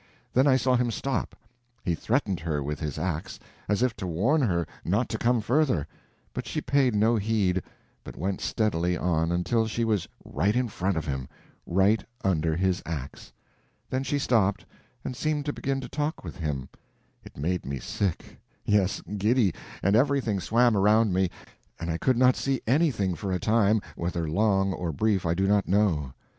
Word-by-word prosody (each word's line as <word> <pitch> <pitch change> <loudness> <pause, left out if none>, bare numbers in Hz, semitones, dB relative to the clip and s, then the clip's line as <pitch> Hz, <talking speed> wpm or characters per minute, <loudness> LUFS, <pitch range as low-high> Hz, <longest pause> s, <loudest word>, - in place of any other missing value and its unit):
Then 130 +3 +4
I 135 - +5
saw 130 0 +2
him 125 -1 +1
stop. 125 +1 -2 0.5
He 85 - 0
threatened 105 - 0
her 80 -3 -2
with 75 +2 -4
his 75 -4 -4
ax, 85 -4 -3 0.3
as 105 +3 +2
if 125 -3 +1
to 95 -3 -4
warn 115 - +2
her 85 -9 +1 0.2
not 105 +8 0
to 110 - -2
come 120 -1 +2
further, 125 - +2 0.5
but - - -5
she - - -2
paid 135 -5 +2
no 110 +3 +3
heed, 100 -4 +1 0.4
but - - -9
went 95 +2 -2
steadily 90 -5 0
on, 85 -2 +1
until 110 +6 +1
she 115 +1 -1
was 105 -5 0 0.2
right 100 +6 0
in 125 -1 +1
front 95 -2 -1
of 80 - -2
him—right 85 +9 -1 0.2
under 80 -4 +1
his 95 +1 +1
ax. 75 -4 -6 0.6
Then 130 - 0
she 140 +2 0
stopped, 110 -7 +1 0.4
and 130 - -3
seemed 150 +1 -1
to 145 - -1
begin 135 0 -2
to - - -6
talk 150 +2 -3
with 80 -7 -8
him. 70 -4 -3 0.5
It - - -14
made 85 +5 -1
me 70 +1 -4
sick, 95 +6 -3 0.3
yes, 100 -2 +2 0.2
giddy, 105 -2 +3 0.3
and 100 +2 +3
everything 125 -5 +2
swam 120 +4 +3
around 105 +1 +4
me, 95 0 +2 0.5
and 85 0 -3
I 80 - -2
could 130 -2 +2
not 125 0 +5
see 135 -2 -1
anything 120 - +2
for 95 +3 -4
a 90 - 0
time—whether 90 -7 0
long 95 +2 +2
or 90 -2 -3
brief 100 +2 +1
I 85 - +1
do 95 +2 +1
not 100 0 +2
know. 85 -9 +1
100 Hz, 175 wpm, -27 LUFS, 85-120 Hz, 0.6 s, I